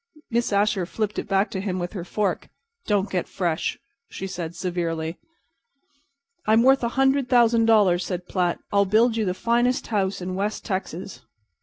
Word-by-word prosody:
Miss 235 0 0
Asher 200 -3 +1
flipped 215 +1 -2
it - - -5
back 195 +1 +1
to 190 - -3
him 190 -2 -2
with 175 +1 -4
her 185 -5 -5
fork. 205 +3 -2 0.4
"Don't 205 -2 +2
get 180 -2 -1
fresh," 170 -4 -2 0.3
she 190 - -6
said, 175 -3 -5
severely. 165 -2 -3 1.3
"I'm 220 +2 +5
worth 265 0 +5
a - - +2
hundred 270 -1 +3
thousand 235 -2 +4
dollars," 200 -5 +4
said 180 -1 -5
Platt. 180 -2 0 0.2
"I'll 200 0 +4
build 220 +4 +3
you 220 -2 0
the 180 -1 -1
finest 240 +4 +1
house 195 -2 0
in 185 0 -4
West 205 +3 -3
Texas." 190 -2 -4
200 Hz, 170 wpm, -24 LUFS, 180-225 Hz, 1.3 s, I'm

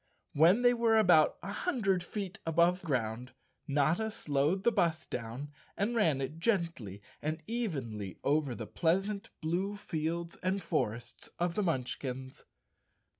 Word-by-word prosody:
When 175 +11 +5
they 245 0 +6
were 230 -2 +3
about 175 -7 +5
a 195 - -4
hundred 200 - 0
feet 195 -1 -5
above 170 +3 +3
ground, 125 -5 -2 0.3
Notta 155 +10 +2
slowed 155 -1 0
the 235 - +4
bus 170 -7 +1
down 125 +5 -5 0.3
and 215 +4 0
ran 160 - +3
it 145 +4 -4
gently 165 - -1 0.2
and 155 +2 -3
evenly 135 - -3
over 145 -3 +1
the 115 - -5
pleasant 195 - 0
blue 180 +6 -1
fields 170 -2 -3
and 190 +2 0
forests 120 -8 -2
of 175 0 0
the 210 - 0
Munchkins. 130 -5 -3
165 Hz, 135 wpm, -32 LUFS, 135-195 Hz, 0.3 s, they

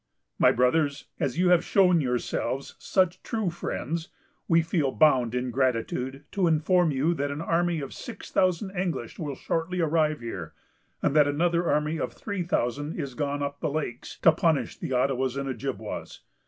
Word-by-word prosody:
"My - - +6
Brothers, 140 +3 +1
as 135 - -1
you 180 0 +3
have 180 -2 +5
shown 180 -4 +4
yourselves 125 0 -2
such 185 -1 +1
true 220 -6 -2
friends, 165 -1 -4 0.4
we 165 -1 +4
feel 160 -4 0
bound 130 -7 +3
in 125 0 -1
gratitude 130 +2 -1
to 190 -3 +1
inform 165 +2 +3
you 145 +4 +1
that 145 -3 -2
an 140 +1 -4
army 170 0 +1
of 135 - -6
six 225 -5 -9
thousand 185 +1 +1
English 170 -10 -3
will 145 -4 -3
shortly 165 +6 -2
arrive 155 -2 +1
here, 100 -8 -6 0.5
and 140 - +1
that 150 -2 +6
another 170 +3 +1
army 150 +2 +1
of - - -3
three 200 -3 -4
thousand 145 -2 -1
is 140 -4 -4
gone 145 0 -2
up 140 0 -4
the - - -1
lakes, 140 -5 -4
to 165 - +8
punish 160 -2 +1
the - - -6
Ottawas 130 0 +1
and 140 0 -2
Ojibwas. 135 0 -5
150 Hz, 170 wpm, -27 LUFS, 135-170 Hz, 0.5 s, to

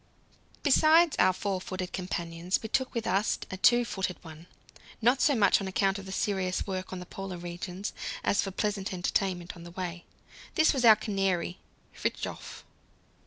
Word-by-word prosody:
Besides 315 +3 +5
our 185 +1 +6
four 190 0 -2
footed 185 -1 -5
companions, 170 -1 -2
we 220 - -5
took 260 +2 0
with 230 - -2
us 200 +3 +1
a 185 - -4
two 240 +5 +5
footed 190 -5 -3
one, 160 +1 -12 0.5
not 245 +4 +3
so 290 - +4
much 205 -2 +4
on 195 - -3
account 195 +1 +1
of 195 - -10
the - - -6
serious 190 -2 -1
work 185 -1 -4
in 185 - -4
the 180 - -7
Polar 195 0 -6
regions 175 +3 -5 0.3
as 200 - +2
for 195 - -3
pleasant 200 0 -2
entertainment 180 -1 -1
on 170 - -12
the 170 - -9
way. 175 -1 -5 0.5
This 315 -2 +5
was 265 -3 -1
our 220 -2 +10
canary 195 -4 -1 0.3
"Fridtjof." - - -4
190 Hz, 170 wpm, -29 LUFS, 180-210 Hz, 0.5 s, our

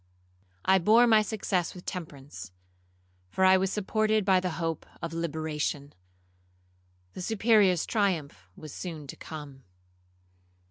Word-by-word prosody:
I 190 0 +5
bore 220 +7 +5
my 220 -2 +5
success 195 -5 -2
with 180 - -11
temperance, 140 - -7 0.8
for 190 - +1
I 185 0 +7
was 190 0 +1
supported 215 +1 +1
by 190 -2 +4
the 180 -2 -3
hope 165 -2 -3
of 165 -1 -5
liberation. 155 -3 -3 1.2
The - - -7
Superior's 210 -3 +3
triumph 155 - -1
was 155 -2 -10
soon 160 -5 -6
to 135 - -8
come. 145 -4 -9
180 Hz, 125 wpm, -28 LUFS, 150-200 Hz, 1.2 s, I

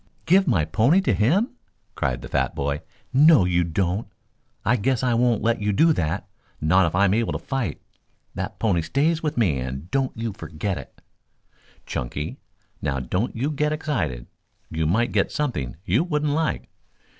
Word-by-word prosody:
"Give 190 +2 +4
my 90 - +3
pony 120 - +3
to 190 - +1
him?" 185 - +2 0.4
cried - - -2
the - - -6
fat - - 0
boy. 70 +1 -2 0.3
"No, 145 - +6
you 90 -1 +2
don't! 90 +4 -1 0.6
I 120 - +4
guess 125 +2 0
I 125 -2 +2
won't 120 -2 +2
let 115 0 +1
you 105 0 +1
do 160 +10 +4
that 85 - -2 0.3
not 85 +3 +4
if 80 - -3
I 100 +2 +4
am 95 - +3
able 115 +1 +1
to - - -1
fight. 135 - -3 0.5
That - - -5
pony 95 -7 +1
stays 150 - +1
with 150 -4 -2
me, 90 - +2
and 65 +6 -5
don't 135 -3 0
you 115 -2 -3
forget 90 +2 -4
it." - - -13 0.8
"Chunky, 70 +5 -4 0.4
now 70 -2 -1
don't 90 - -2
you 135 +6 -1
get 150 +1 0
excited. 145 - -2 0.5
You 80 -1 0
might 115 +9 +2
get - - +1
something 120 - -2
you 110 - +2
wouldn't 150 -4 0
like." 160 +1 -1
110 Hz, 175 wpm, -24 LUFS, 85-140 Hz, 0.8 s, No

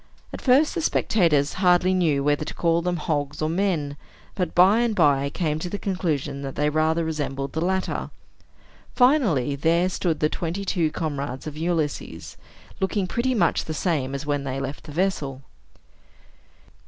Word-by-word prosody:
At - - -6
first 275 +4 +4
the 335 - -2
spectators 165 - +2
hardly 180 0 +4
knew 160 -7 +2
whether 145 +1 +1
to - - -7
call 170 0 +2
them 175 0 -1
hogs 145 -2 -2
or 155 - 0
men, 165 -6 -1 0.4
but 180 -2 -3
by 190 +5 +6
and 235 -2 +1
by 140 -5 +3
came 155 0 -2
to 180 - -4
the 205 - -3
conclusion 155 -8 -2
that 135 -1 -6
they 150 0 +1
rather 160 +2 +1
resembled 140 -3 -3
the 160 - -2
latter. 190 +2 -1 0.9
Finally, 225 - +3
there 170 +5 +2
stood 175 -3 -1
the 150 - +3
twenty 175 +5 -4
two 170 -4 +1
comrades 140 -5 -4
of 155 -2 -6
Ulysses, 155 - -3 0.4
looking 190 0 0
pretty 240 +7 -1
much 220 - +2
the 155 - -4
same 145 -6 -1
as 140 - -5
when 145 -1 -1
they 135 0 -3
left 135 +1 -6
the 150 - -9
vessel. 145 -6 -2
160 Hz, 165 wpm, -24 LUFS, 145-185 Hz, 0.9 s, by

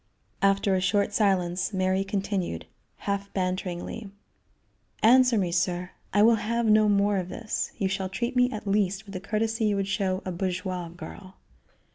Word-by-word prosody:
After 195 0 +3
a 185 - +2
short 200 +2 +1
silence, 185 -2 +1
Mary 190 0 +1
continued, 195 - -2 0.4
half 200 0 -2
banteringly: 185 +2 -3 0.9
"Answer 250 +1 +6
me, 185 -4 0
sir! 180 0 -1 0.2
I 205 +1 +4
will 230 0 +6
have 235 +2 0
no 215 -1 +5
more 200 0 +3
of 185 -1 -3
this. 225 +2 -3
You 195 - 0
shall 190 -1 -2
treat 235 +7 -3
me 250 0 +4
at 215 -3 -6
least 200 0 0
with 200 - -11
the 185 - -4
courtesy 220 +3 -1
you 210 -1 +2
would 195 -1 -1
show 195 -2 -1
a 185 - -2
bourgeoise 180 -1 -3
girl." 185 +3 -10
195 Hz, 165 wpm, -27 LUFS, 185-210 Hz, 0.9 s, Answer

